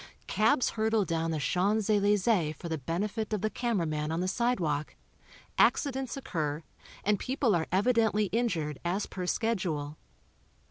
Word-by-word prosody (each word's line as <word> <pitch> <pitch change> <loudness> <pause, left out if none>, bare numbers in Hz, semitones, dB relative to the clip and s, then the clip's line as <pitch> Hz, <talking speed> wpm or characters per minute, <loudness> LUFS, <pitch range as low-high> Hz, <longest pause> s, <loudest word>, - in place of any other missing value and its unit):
Cabs 225 +5 +2
hurtle 220 -2 +1
down 165 -1 -1
the 160 - -1
Champs 195 +9 +1
Elysee 205 -5 +2
for 165 +3 -8
the 160 -2 -2
benefit 205 - -2
of 210 - -1
the 215 +1 0
camera 230 -8 0
man 155 0 -2
on 165 - -1
the 185 - 0
sidewalk, 180 -10 0 0.6
accidents 265 -3 +2
occur 155 - -3 0.4
and 205 -1 +2
people 255 -3 +1
are 160 -2 0
evidently 215 +1 +3
injured 165 - 0
as 180 +4 -1
per 180 -2 -5
schedule. 170 -10 -1
195 Hz, 145 wpm, -30 LUFS, 160-225 Hz, 0.6 s, evidently